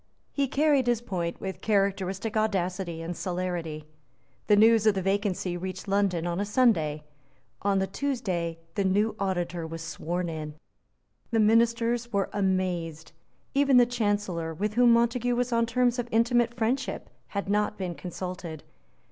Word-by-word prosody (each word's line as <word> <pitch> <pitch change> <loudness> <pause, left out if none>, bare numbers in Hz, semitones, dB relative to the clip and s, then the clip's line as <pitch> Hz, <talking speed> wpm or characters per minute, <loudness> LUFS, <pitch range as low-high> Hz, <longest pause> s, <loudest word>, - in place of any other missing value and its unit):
He 280 -1 0
carried 280 -2 +2
his 240 -2 +2
point 180 -7 -3
with 190 -1 -5
characteristic 195 0 0
audacity 185 -5 -1
and 170 +1 -4
celerity. 175 -4 -3 0.6
The 210 - +6
news 220 +1 +5
of 210 - +5
the 190 - 0
vacancy 195 -2 0
reached 185 +2 -6
London 195 -4 +1
on 175 +1 -2
a - - +1
Sunday. 200 - +2 0.6
On 200 -1 +2
the 190 - +2
Tuesday 190 -8 -2 0.2
the 200 - 0
new 205 +3 +1
Auditor 175 -3 -2
was 165 0 -6
sworn 175 +2 -3
in. 155 -2 -5 0.7
The 225 - +1
ministers 230 +2 +2
were 200 -2 0
amazed. 180 -5 -1 0.4
Even 275 -2 +4
the 245 - +7
Chancellor, 205 -8 -1
with 210 +5 -2
whom 240 +1 +5
Montague 240 +1 +2
was 245 +1 0
on 230 0 +2
terms 245 +1 +1
of 240 - -2
intimate 235 +1 +2
friendship, 245 +4 -1 0.2
had 200 -1 -4
not 210 +1 0
been 185 -3 -3
consulted. 180 -2 -6
200 Hz, 150 wpm, -27 LUFS, 175-230 Hz, 0.7 s, the